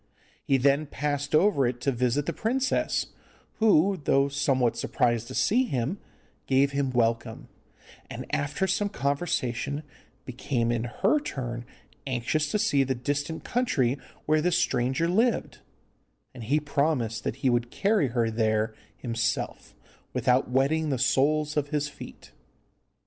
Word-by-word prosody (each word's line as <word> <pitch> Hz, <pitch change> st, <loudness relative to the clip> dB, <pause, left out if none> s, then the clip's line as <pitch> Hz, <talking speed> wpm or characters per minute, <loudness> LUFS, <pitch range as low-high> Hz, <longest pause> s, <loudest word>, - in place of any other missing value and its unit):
He 135 Hz, -, +2 dB
then 140 Hz, +3 st, +2 dB
passed 145 Hz, 0 st, -2 dB
over 155 Hz, -7 st, +4 dB
it 120 Hz, 0 st, -3 dB
to 140 Hz, -, +1 dB
visit 125 Hz, +3 st, 0 dB
the -, -, -2 dB
princess, 260 Hz, +4 st, -1 dB, 0.5 s
who, 195 Hz, -4 st, +4 dB
though 140 Hz, 0 st, +3 dB
somewhat 135 Hz, -4 st, +1 dB
surprised 120 Hz, -3 st, 0 dB
to 130 Hz, -, -7 dB
see 245 Hz, +6 st, +3 dB
him, 135 Hz, -, -2 dB, 0.5 s
gave 135 Hz, +1 st, +3 dB
him 140 Hz, -1 st, 0 dB
welcome, 115 Hz, -2 st, -1 dB, 0.6 s
and -, -, -6 dB
after 145 Hz, +6 st, 0 dB
some 200 Hz, +2 st, 0 dB
conversation 140 Hz, -, -2 dB, 0.4 s
became 120 Hz, -2 st, -1 dB
in 120 Hz, 0 st, -1 dB
her 210 Hz, -, +1 dB
turn 120 Hz, -, -5 dB, 0.4 s
anxious 135 Hz, +4 st, 0 dB
to -, -, +1 dB
see 140 Hz, -8 st, +2 dB
the 130 Hz, 0 st, -1 dB
distant 145 Hz, +5 st, -3 dB
country 140 Hz, -, +1 dB, 0.3 s
where 155 Hz, 0 st, +3 dB
this 175 Hz, +1 st, +2 dB
stranger 130 Hz, +6 st, +1 dB
lived, 225 Hz, +7 st, +1 dB, 0.7 s
and 120 Hz, -4 st, -8 dB
he 145 Hz, +6 st, +2 dB
promised 140 Hz, -6 st, -1 dB
that -, -, -2 dB
he -, -, +5 dB
would 120 Hz, 0 st, 0 dB
carry 200 Hz, -, +1 dB
her 115 Hz, -2 st, 0 dB
there 110 Hz, -1 st, +1 dB, 0.2 s
himself, 115 Hz, -2 st, -3 dB, 0.4 s
without 125 Hz, +1 st, +2 dB
wetting 145 Hz, +5 st, +1 dB
the 135 Hz, -, 0 dB
soles 150 Hz, +4 st, +2 dB
of 145 Hz, -1 st, 0 dB
his 150 Hz, -1 st, -1 dB
feet. 140 Hz, -, -12 dB
140 Hz, 140 wpm, -27 LUFS, 120-155 Hz, 0.7 s, he